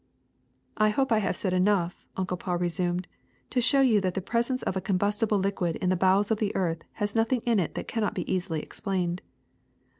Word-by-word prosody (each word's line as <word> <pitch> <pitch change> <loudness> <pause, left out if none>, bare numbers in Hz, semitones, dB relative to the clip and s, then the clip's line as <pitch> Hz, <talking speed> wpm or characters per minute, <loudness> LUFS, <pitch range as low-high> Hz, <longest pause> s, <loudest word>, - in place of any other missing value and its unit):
' - - -42
' - - -39
^^I 215 0 +5
hope 265 +4 0
I 220 - +5
have 195 -3 -1
said 185 -3 -2
enough," 185 -2 +1
Uncle 185 -1 -1
Paul 180 0 -2
resumed, 175 +1 -1 0.4
^'to 250 - +2
show 275 +3 +4
you 230 -6 +4
that 185 -2 -1
the - - +1
presence 235 +6 -1
of - - -1
a 190 - -1
combustible 205 +3 +1
liquid 190 -3 0
in 180 - -1
the 185 - +3
bowels 190 +3 +3
of 215 - +1
the 210 -2 -1
earth 165 -3 -1
has 205 -1 -2
nothing 230 +2 +1
in 230 -3 +3
it 170 - -2
that - - -4
cannot 220 -2 -1
be 180 - -2
easily 175 -4 -1
explained. 185 -3 -2
195 Hz, 215 wpm, -27 LUFS, 180-215 Hz, 0.4 s, ^^I